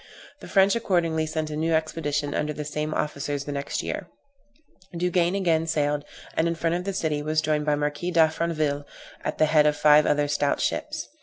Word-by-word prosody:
The - - -10
French 195 +2 +4
accordingly 170 -7 0
sent 155 0 -3
a - - -3
new 160 +1 +1
expedition 150 -2 -1
under 150 0 -1
the 150 0 -5
same 150 +1 -3
officers 145 -2 -2
the 145 - -5
next 140 0 -3
year. - - -4 0.9
Duguesne 175 +1 +1
again 165 -4 +1
sailed, 150 -2 0 0.3
and 160 - +2
in 170 - -1
front 165 0 0
of 180 +1 -3
the 195 - -2
city 155 -5 -1
was 155 +1 0
joined 155 -1 0
by 150 - +3
the - - +1
Marquis 150 +4 -2
D'Affranville, 160 -3 +1 0.4
at - - -3
the 155 - +4
head 150 -1 +4
of 150 0 +1
five 150 0 +6
other 145 0 +2
stout 145 0 0
ships. - - -2
155 Hz, 200 wpm, -25 LUFS, 150-165 Hz, 0.9 s, five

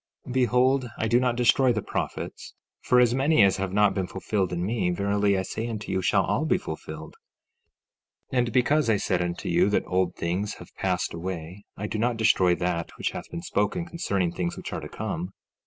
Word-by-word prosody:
15:6 - - -5
Behold, 130 +1 +2
I 110 - 0
do 120 +2 +4
not 125 -1 +1
destroy 125 +2 +4
the 110 -3 -1
prophets, - - -5 0.3
for 125 - +4
as 120 -1 +4
many 135 -1 +4
as 95 -1 +4
have 95 -1 -2
not 105 0 +3
been 95 -2 -2
fulfilled 95 0 -2
in 90 0 -2
me, 110 -3 0
verily 100 +2 +1
I 95 - 0
say 110 +4 -4
unto 110 -3 -5
you, 95 - 0
shall - - +3
all - - 0
be - - +3
fulfilled. 80 0 -8 1.2
15:7 - - +1
And 120 -1 +1
because 130 +1 +2
I 110 - +4
said 90 -2 0
unto 85 0 -3
you 90 +3 +3
that 105 - +1
old 90 -1 0
things 95 +5 -2
have - - -13
passed - - -1
away, 85 +2 -6
I 105 - -4
do 110 - -3
not 120 +1 +1
destroy 95 -5 +4
that 85 -2 -2
which - - -1
hath - - -7
been 85 - -6
spoken 105 - -1
concerning 100 - -1
things 85 0 -3
which - - -6
are - - -3
to - - -8
come. 90 +4 -4
100 Hz, 210 wpm, -26 LUFS, 90-120 Hz, 1.2 s, do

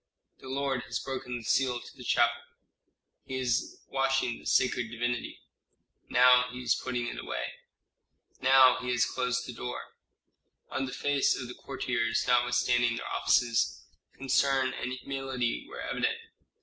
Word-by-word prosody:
"The - - -12
lord 135 -1 -1
has - - -3
broken 130 -2 -4
the 120 - -9
seal 125 +2 +1
to - - -13
the - - -11
chapel - - +2 0.8
He 130 - -6
is 125 -1 -1
washing 135 -3 0
the - - -9
sacred 120 -2 +2
divinity 120 +1 -3 0.7
Now 125 0 +6
he 125 0 -7
is 115 -2 +3
putting 125 0 -3
it 120 - -5
away - - -4 0.9
Now 130 0 +6
he 125 0 -4
has 125 -1 +3
closed 125 0 -1
the 125 - -7
door 125 +1 -6 0.4
" - - -48
On 135 0 -2
the - - -6
faces 135 -2 +1
of 125 - -8
courtiers, 120 -4 -1
notwithstanding 120 -1 +3
their - - -5
offices, 120 -2 +2 0.3
concern 135 0 +2
and 125 - -4
humility 135 - -3
were 455 - -7
evident. 450 - -1
125 Hz, 150 wpm, -29 LUFS, 120-135 Hz, 0.9 s, Now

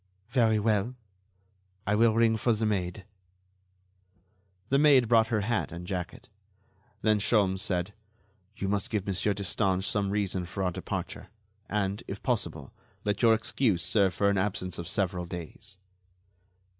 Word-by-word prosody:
"Very 115 -4 +3
well. 105 +3 +1 0.9
I 100 - +1
will 110 +1 +4
ring 115 -1 +4
for 115 +2 +2
the 110 +1 -1
maid." 95 -3 -2 1.6
The 135 - +3
maid 140 -5 +6
brought 115 -1 +4
her 110 -2 0
hat 110 +2 -1
and 85 0 -7
jacket. 90 -2 -5 0.8
Then 110 -1 +3
Sholmes 100 -3 +2
said: 90 +1 -1 0.6
"You 100 - -3
must 100 0 -1
give 105 -3 -1
Monsieur 100 +1 0
Destange 95 -1 0
some 100 0 0
reason 95 -3 -1
for 95 +3 -4
our 90 - +1
departure, - - -5 0.4
and, 100 0 -1
if 100 - -7
possible, 85 - -2 0.3
let 105 -1 0
your 115 -2 +6
excuse 110 -5 0
serve 95 0 +2
for 100 - +2
an 100 - +1
absence 95 -2 -2
of 85 - -5
several 90 -2 -1
days." 90 +4 -8
100 Hz, 145 wpm, -28 LUFS, 95-110 Hz, 1.6 s, maid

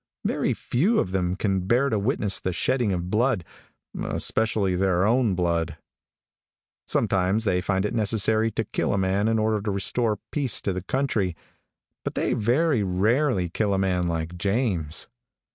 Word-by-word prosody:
Very - - 0
few 185 - +1
of 90 - -1
them 90 -1 0
can 95 -2 -1
bear 125 +6 +3
to 110 - 0
witness 105 -2 0
the 95 - -2
shedding 120 +5 +1
of 90 0 -3
blood, 110 -5 +1 0.6
especially 110 -4 +1
their 95 0 +2
own 115 -3 +2
blood. 85 -2 -1 1.1
Sometimes 100 +4 +1
they 90 -3 +1
find 95 +1 0
it - - -2
necessary 110 0 +2
to 115 +1 -2
kill - - -1
a - - +1
man 95 +2 +1
in 115 0 +2
order 110 -1 +1
to 105 - -3
restore 105 +3 0
peace 135 -7 0
to 100 - -1
the 90 - -3
country, 105 -5 -1 0.7
but - - -4
they - - 0
very 125 +4 +2
rarely 100 +3 +1
kill 100 +3 0
a - - 0
man 90 -2 0
like 85 +1 -3
James. 95 - -1
100 Hz, 160 wpm, -25 LUFS, 90-115 Hz, 1.1 s, bear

